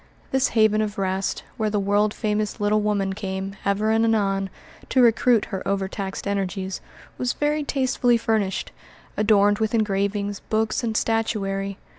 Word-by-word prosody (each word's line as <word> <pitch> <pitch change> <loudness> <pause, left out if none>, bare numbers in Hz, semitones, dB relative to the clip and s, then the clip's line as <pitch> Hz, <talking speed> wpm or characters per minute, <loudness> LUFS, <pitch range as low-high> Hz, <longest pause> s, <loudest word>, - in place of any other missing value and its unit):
This 265 -1 +3
haven 215 0 +4
of 215 0 -3
rest, 190 0 -1
where 220 -2 0
the 210 -1 0
world 205 +1 +2
famous 210 -1 -2
little 210 +1 +2
woman 200 -2 0
came, 195 0 -4
ever 205 +2 +1
and 225 0 +3
anon, 195 -4 +1 0.4
to 260 - +2
recruit 235 -1 +4
her 190 - -2
overtaxed 195 0 -3
energies, 195 -1 -2 0.4
was 250 -1 0
very 295 +1 0
tastefully 260 -3 +2
furnished, 220 -4 -1 0.4
adorned 205 -1 +3
with 220 +1 0
engravings, 200 -1 0
books, 220 +2 -1
and 225 -2 0
statuary. 200 -3 -1
210 Hz, 145 wpm, -23 LUFS, 195-220 Hz, 0.4 s, haven